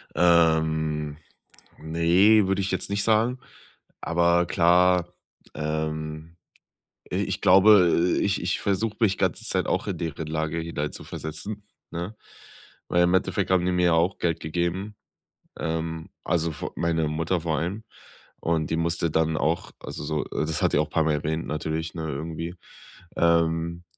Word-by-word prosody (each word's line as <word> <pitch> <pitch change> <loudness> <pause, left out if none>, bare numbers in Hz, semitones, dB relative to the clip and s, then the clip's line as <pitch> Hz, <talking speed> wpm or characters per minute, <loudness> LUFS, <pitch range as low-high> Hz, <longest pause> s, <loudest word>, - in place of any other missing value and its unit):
Ähm, 80 -3 +2 0.6
ne, 90 +6 +4
würde 95 +1 +1
ich 95 0 -2
jetzt 95 +1 -2
nicht 100 0 -1
sagen. 115 +3 +2 0.6
Aber, 85 +1 +2
klar, 90 0 +3 0.4
ähm, 80 +1 -4 0.8
i - - 0
ich - - -2
glaube, 90 -3 +5
äh, - - 0
ich 100 -1 0
ich 90 - -1
versuche 105 +2 -1
mich 105 -4 +2
ganze 95 -4 0
Zeit - - 0
auch - - -1
in 95 -5 -3
deren 80 -2 -4
Lage 80 +1 -2
hineinzuversetzen, 80 +5 -5 0.3
ne? 85 +6 -5 0.7
Weil 90 0 +3
im 90 - +2
Endeffekt 95 - 0
haben 95 -1 +3
die 90 - +1
mir 90 0 +2
ja 85 - +4
auch 85 +4 +1
Geld 85 -2 -1
gegeben. 90 +6 -3 0.6
Ähm, 80 0 -3
also 85 -1 0
vo - - -6
meine 80 -2 0
Mutter 80 +3 -1
vor 80 -2 -1
allem. 95 +7 -3 0.6
Und 80 -2 -1
die 80 - +1
musste 85 0 0
dann 80 0 +1
auch, 80 +2 -1
also - - -7
so 75 0 -2
äh, - - -2
das 80 -1 -2
hat - - +2
die - - +4
auch 75 0 0
paar 80 - +1
Mal 80 - +2
erwähnt 80 +2 -2
natürlich, 80 +1 -3
ne, 80 - -4
irgendwie, 80 +4 -5 0.6
ähm 85 0 +1
85 Hz, 155 wpm, -25 LUFS, 80-90 Hz, 0.8 s, glaube